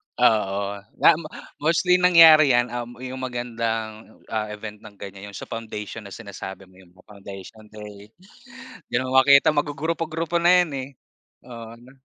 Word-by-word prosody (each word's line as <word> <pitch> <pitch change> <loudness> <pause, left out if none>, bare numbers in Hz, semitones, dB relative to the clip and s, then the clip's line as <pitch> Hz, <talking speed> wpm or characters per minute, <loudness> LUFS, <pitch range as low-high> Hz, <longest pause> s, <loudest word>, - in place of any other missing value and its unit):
Oo, 100 -4 +1 0.2
nam 165 -1 +6 0.4
mostly 180 +3 +2
nangyari 165 -4 +7
'yan, 120 0 +1
um, 120 0 -6
yung 130 +1 -7
magandang, 115 -3 -5
oh, - - -27
ah, 105 -1 -1
event 105 0 -8
ng 100 - -14
ganyan, 100 0 -10
'yong 100 - -12
sa - - -8
foundation 110 -1 -7
na - - -9
sinasabi 100 -3 -9
mo 95 - -24
yung 90 -2 -19
mga 95 - -22
foundation 100 +2 -12
day. 105 -1 -12 0.8
Di - - -4
na 130 - -1
makita 140 +3 +5
mago-grupo-grupo 160 +3 -2
na 175 +1 +5
yan, 160 - -8
eh. 135 0 -5 0.6
Oo, 115 -2 -10
'no? 125 +2 -18
115 Hz, 160 wpm, -23 LUFS, 105-145 Hz, 0.8 s, nangyari